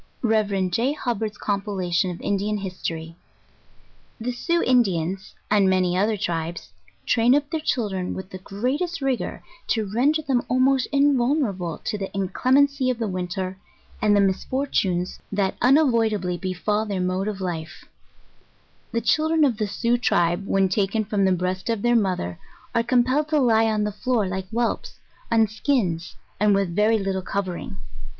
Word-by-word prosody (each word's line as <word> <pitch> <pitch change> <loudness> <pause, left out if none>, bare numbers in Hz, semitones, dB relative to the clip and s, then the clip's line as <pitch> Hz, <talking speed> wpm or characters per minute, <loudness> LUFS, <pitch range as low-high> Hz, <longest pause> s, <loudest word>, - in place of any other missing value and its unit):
Rev. 205 -5 +1
J. 245 +9 +1
Hubbard's 225 -7 -3
compilation 195 -3 -1
of 175 - -6
Indian 205 +1 -1
History. 165 -4 -5 1.0
The 240 +2 -2
Sioux 340 +7 0
Indians, 195 -6 +1 0.2
and 200 -2 +4
many 185 -1 +2
other 210 +3 +1
tribes, 170 -3 -3 0.3
train 245 +2 +4
up 290 0 +1
their 320 - 0
chil 245 -8 -1
dren 185 -2 -3
with 190 0 -8
the 185 - -7
greatest 270 - -2
rigour 265 -3 -2 0.2
to 220 -2 0
render 270 +10 +1
them 260 -4 +1
almost 260 +1 +3
invulner 280 -3 +2
able 175 -3 -5
to 210 - -4
the 195 - -3
inclemency 260 +7 +2
of 250 - 0
the 225 -2 -2
winter, 185 0 -4 0.4
and 210 -1 +4
the 200 - +4
misfortunes 190 -3 0
that 200 -2 0
unavoidably 230 - +3
befal 190 +4 -1
their 200 -3 -3
mode 185 +2 -1
of 210 -2 -3
life: 170 -3 -5 1.1
The 230 - 0
children 310 +7 +2
of 245 -6 +1
the 215 -2 -1
Sioux 235 +4 0
tribe, 175 -3 +1
when 195 -1 +3
taken 200 +3 0
from 200 -1 +1
the 190 - +3
breast 185 +3 -1
of 225 -3 -1
their 240 0 +3
mother 185 - 0 0.3
are 230 - +3
compelled 255 +5 +2
to 305 -1 +2
lie 225 -4 +4
on 215 -1 +1
the 210 - -1
floor 235 +1 0
like 185 0 -4
whelps, 235 +2 -2 0.4
on 225 -1 +5
skins, 210 - -1 0.2
and 205 0 +4
with 195 -4 0
very 215 +2 +3
liitle 195 -2 -2
covering. 195 +1 -4
210 Hz, 160 wpm, -24 LUFS, 185-245 Hz, 1.1 s, on